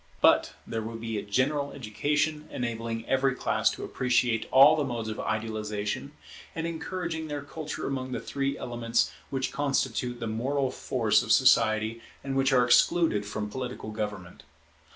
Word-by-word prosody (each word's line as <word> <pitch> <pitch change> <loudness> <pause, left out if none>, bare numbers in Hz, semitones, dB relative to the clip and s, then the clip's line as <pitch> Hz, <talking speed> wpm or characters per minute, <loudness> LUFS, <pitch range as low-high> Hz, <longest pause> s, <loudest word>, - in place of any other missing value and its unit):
But - - +4
there 115 - -3
will 115 +1 -6
be 115 -1 -3
a - - -6
general 140 +7 0
education, 150 +5 -1
enabling 115 -1 -3
every 135 0 +2
class - - +1
to - - -6
appreciate 120 -2 +1
all 140 +4 +8
the 150 - 0
modes 120 -4 -3
of 110 - -5
idealization, 110 +3 -3 0.4
and 165 - -2
encouraging 165 -1 -4
their 145 -1 -4
culture 155 +1 -6
among 130 -1 -3
the - - -2
three 140 0 -2
elements 115 -1 0 0.2
which 135 -1 -2
constitute 130 -3 -1
the 115 - -3
moral 130 +5 -1
force 115 -4 +1
of 110 -2 -3
society 115 -3 +4 0.2
and 135 -1 -3
which 135 +1 +3
are 125 -2 +5
excluded 120 -4 +3
from 105 0 -3
political 125 -3 -5
government. 105 -4 -5
125 Hz, 155 wpm, -28 LUFS, 110-140 Hz, 0.4 s, all